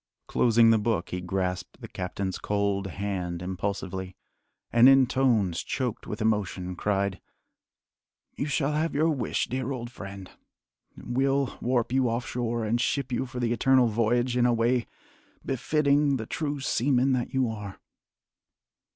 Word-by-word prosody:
Closing 115 -1 +4
the 110 - +4
book, 105 -5 -1
he 90 - -4
grasped 90 -1 -3
the - - -8
captain's 95 0 -4
cold 100 -1 -1
hand 90 -3 -4
impulsively, 95 0 -4 0.6
and 120 +2 +8
in 135 -1 +6
tones 115 -10 +1
choked 125 -5 -3
with 105 +1 -3
emotion, 95 -4 -1
cried: 100 -1 -1 1.1
"You 140 - -2
shall 145 -1 0
have 155 +1 -1
your 160 +3 +3
wish, 130 -7 -1
dear 130 +1 -3
old 120 -2 -5
friend! 100 -4 -9 0.7
We'll 135 +2 0
warp 120 -1 0
you 130 -1 +2
off 115 +1 -2
shore 120 -2 -2
and 115 +3 +1
ship 135 -1 -1
you 125 +2 -1
for 125 - -6
the 120 -1 +1
Eternal 130 0 +4
Voyage 120 +3 +1
in 125 0 +3
a 120 - +3
way 120 +1 +1 0.6
befitting 140 +1 +2
the 110 - -5
true 145 +3 -3
seaman 135 0 +2
that 125 0 -1
you 130 -2 +2
are." 105 -4 -6
120 Hz, 150 wpm, -27 LUFS, 100-130 Hz, 1.1 s, and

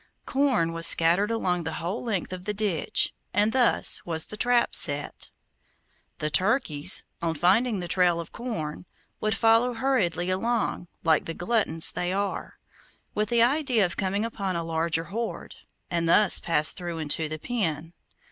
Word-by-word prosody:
Corn 260 -12 0
was 165 0 +5
scattered 175 +6 +4
along 180 -6 -1
the 160 0 -5
whole 175 +7 -4
length 200 -6 -3
of 180 0 -8
the 210 0 -3
ditch, 200 -6 0 0.2
and 210 +2 +3
thus 255 -2 +3
was 160 -2 +1
the - - -8
trap 245 +2 +1
set. 145 0 +1 0.9
The 150 0 -3
turkeys, 185 - +2 0.2
on 165 -1 -1
finding 200 +6 +2
the 175 - -5
trail 175 -1 +2
of 170 - -8
corn, 175 -10 -6 0.3
would 215 0 -1
follow 230 +2 +3
hurriedly 190 -9 0
along, 220 -2 -2 0.2
like 160 -2 +2
the 165 - -6
gluttons 175 -5 +1
they 180 0 -3
are, 200 +1 -4 0.6
with 210 0 -1
the 235 -1 +3
idea 250 -5 +2
of 175 - -5
coming 200 +2 -1
upon 195 -5 -4
a 170 - -2
larger 165 0 -1
hoard, 220 +8 -6 0.4
and 170 -1 -1
thus 205 +2 +4
pass 155 -2 +2
through 175 -2 -6
into 155 0 -1
the 155 - -5
pen. 165 -6 -3
185 Hz, 160 wpm, -25 LUFS, 165-225 Hz, 0.9 s, was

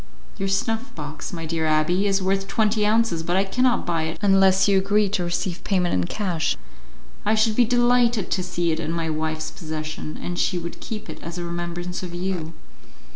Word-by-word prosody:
"Your 195 -1 -1
snuff 225 +6 -1
box, 150 0 -6
my 165 -2 -5
dear 160 0 -1
abbé, 155 +5 +2
is 195 -1 +2
worth 195 +1 0
twenty 215 -1 +2
ounces, 220 -6 +2
but 175 +2 -1
I 190 - +4
cannot 250 +5 +1
buy 165 -2 0
it 160 - -4
unless 195 -1 +5
you 195 -1 +5
agree 205 +2 +2
to 190 -2 0
receive 175 +1 -2
payment 180 -3 +1
in 90 -1 +2
cash; 170 - -1 0.7
I 215 +2 +2
should 215 0 +2
be 245 - +5
delighted 240 -3 +3
to 185 - +1
see 175 -2 -1
it 160 - -1
in 155 - -2
my 165 -1 -1
wife's 155 0 -2
possession, 155 -2 -5
and 175 0 -4
she 185 - +1
would 170 0 -6
keep 215 -2 -6
it - - -8
as 170 +1 -6
a 175 - -3
remembrance 175 +1 -4
of 175 -2 -6
you." 175 -3 -3
180 Hz, 200 wpm, -24 LUFS, 165-205 Hz, 0.7 s, unless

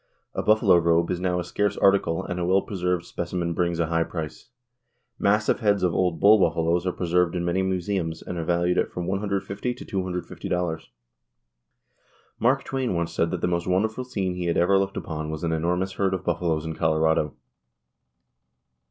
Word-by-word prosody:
A - - -2
buffalo 105 -4 +4
robe 85 0 +2
is 90 - -1
now 90 -1 0
a - - -2
scarce 100 +3 -1
article 95 -4 +3
and 90 - -4
a 85 - -1
well 95 +1 +3
preserved 90 -3 -2
specimen 85 -1 -3
brings 85 0 0
a 85 - +2
high 85 +1 +1
price. 80 -3 -7 0.7
Massive 105 +2 +2
heads 100 -3 +2
of 90 -2 +2
old 90 -3 0
bull 105 +4 +7
buffaloes 85 0 +1
are - - +2
preserved 90 0 +1
in 85 -1 -1
many 90 +2 +1
museums 95 -3 -2
and 90 - -6
are - - -2
valued 85 +1 +1
at - - 0
from 90 - -4
$150 100 +4 -2
to - - -9
$250. 90 -3 -3 1.5
Mark 130 +4 +2
Twain 130 -7 -2
once 85 0 -2
said 85 - +1
that 90 -1 -3
the - - +1
most 85 -1 -1
wonderful 110 +7 0
scene 100 -8 -2
he 90 0 -4
had 85 - 0
ever 95 +3 +4
looked 100 0 -2
upon 80 -1 -4
was 80 +1 -5
an 85 - 0
enormous 90 +4 0
herd 95 -1 0
of 95 - -6
buffaloes 85 -2 0
in 80 - -3
Colorado. 80 -2 +1
90 Hz, 185 wpm, -25 LUFS, 85-95 Hz, 1.5 s, bull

